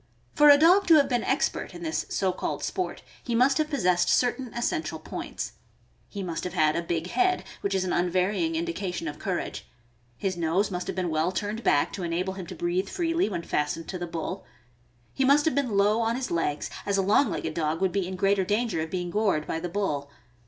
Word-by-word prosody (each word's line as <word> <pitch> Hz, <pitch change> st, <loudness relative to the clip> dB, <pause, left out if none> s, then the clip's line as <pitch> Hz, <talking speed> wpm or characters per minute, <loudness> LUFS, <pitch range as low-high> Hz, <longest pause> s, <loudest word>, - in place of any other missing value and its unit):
Fora 295 Hz, -1 st, +8 dB
dog 360 Hz, +6 st, +5 dB
to 330 Hz, -, +8 dB
have 285 Hz, -3 st, +5 dB
been 245 Hz, -3 st, 0 dB
expert -, -, -1 dB
in 175 Hz, -, -8 dB
this 160 Hz, -1 st, -2 dB
so 190 Hz, -1 st, +1 dB
called 180 Hz, -, -4 dB
sport, 370 Hz, -, -3 dB, 0.2 s
he 235 Hz, -, -2 dB
must 265 Hz, +5 st, +4 dB
have 305 Hz, -1 st, +1 dB
possessed 180 Hz, -, +2 dB
certain 250 Hz, 0 st, +1 dB
essential, 315 Hz, +7 st, -1 dB
points. -, -, -6 dB, 0.6 s
He 200 Hz, -2 st, -5 dB
must 170 Hz, -3 st, -4 dB
have 180 Hz, -, -4 dB
had 155 Hz, -1 st, +3 dB
a 170 Hz, -, 0 dB
big 165 Hz, -1 st, -2 dB
head, 370 Hz, -1 st, +2 dB, 0.2 s
which 200 Hz, -1 st, -1 dB
is 190 Hz, -, +1 dB
an 180 Hz, -, -1 dB
unvarying 185 Hz, -, +1 dB
indication 205 Hz, -, -3 dB
of 150 Hz, 0 st, -6 dB
courage; -, -, -4 dB, 0.5 s
Ms 190 Hz, -2 st, -2 dB
nose 175 Hz, +5 st, +1 dB
must 180 Hz, -1 st, -3 dB
have -, -, -3 dB
been 180 Hz, -3 st, -1 dB
well 155 Hz, +3 st, +1 dB
turned 210 Hz, +4 st, -3 dB
back 145 Hz, -, +2 dB
to 195 Hz, -, -5 dB
enable 175 Hz, +3 st, -1 dB
him 190 Hz, -3 st, -7 dB
to -, -, -7 dB
breathe 175 Hz, +2 st, -1 dB
freely 335 Hz, -, 0 dB
when 170 Hz, -4 st, -3 dB
fastened 150 Hz, +2 st, -2 dB
to 185 Hz, -, -4 dB
the 175 Hz, -, -4 dB
bull; 165 Hz, -1 st, -4 dB, 0.7 s
he 270 Hz, -, 0 dB
must 280 Hz, +2 st, +5 dB
have 320 Hz, -, +2 dB
been 255 Hz, -7 st, 0 dB
low 210 Hz, +3 st, +3 dB
on 230 Hz, +1 st, +1 dB
his 255 Hz, 0 st, -3 dB
legs, 160 Hz, -3 st, -1 dB
as 200 Hz, -1 st, 0 dB
a 195 Hz, -, +2 dB
long 210 Hz, +8 st, +4 dB
legged 160 Hz, -, -3 dB
dog 155 Hz, 0 st, -1 dB
would 190 Hz, -1 st, +1 dB
be 195 Hz, -2 st, -1 dB
in 190 Hz, -, -5 dB
greater 195 Hz, +1 st, +2 dB
danger 210 Hz, -3 st, 0 dB
of 160 Hz, -, -4 dB
being 175 Hz, -1 st, -3 dB
gored 200 Hz, -7 st, +1 dB
by 160 Hz, -, -3 dB
the 175 Hz, +1 st, -4 dB
bull. 150 Hz, -7 st, -2 dB
190 Hz, 220 wpm, -27 LUFS, 170-245 Hz, 0.7 s, Fora